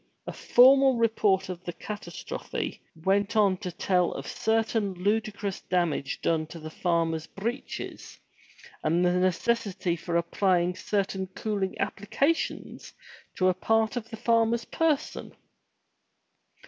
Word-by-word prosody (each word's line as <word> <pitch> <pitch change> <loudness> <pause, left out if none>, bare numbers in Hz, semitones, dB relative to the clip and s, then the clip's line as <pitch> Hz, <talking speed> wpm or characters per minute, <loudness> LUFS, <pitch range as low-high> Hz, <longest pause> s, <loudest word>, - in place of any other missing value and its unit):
A - - -5
formal 265 +1 +6
report 210 -4 +2
of 180 -1 -7
the 175 - -5
catastrophe 210 +5 -6 0.2
went 200 +3 +1
on 200 -3 +4
to 180 - -5
tell 180 0 +1
of 135 - -6
certain 220 -3 0
ludicrous 205 +1 -1
damage 170 -6 -1
done 160 -1 0
to 170 - -10
the 155 0 -8
farmer's 165 -2 0
breeches 235 +7 -6 0.7
and 170 +3 +2
the 180 - +3
necessity 185 0 0
for 170 +1 -2
applying 180 +1 +1
certain 195 -2 -2
cooling 195 0 -3
applica 210 +10 +1
tions - - -6 0.4
to 185 - +2
a 185 - +4
part 220 +5 +1
of 225 -2 -4
the 225 - -7
farmer's 230 0 +2
person. 310 -3 -1
195 Hz, 125 wpm, -27 LUFS, 175-225 Hz, 0.7 s, formal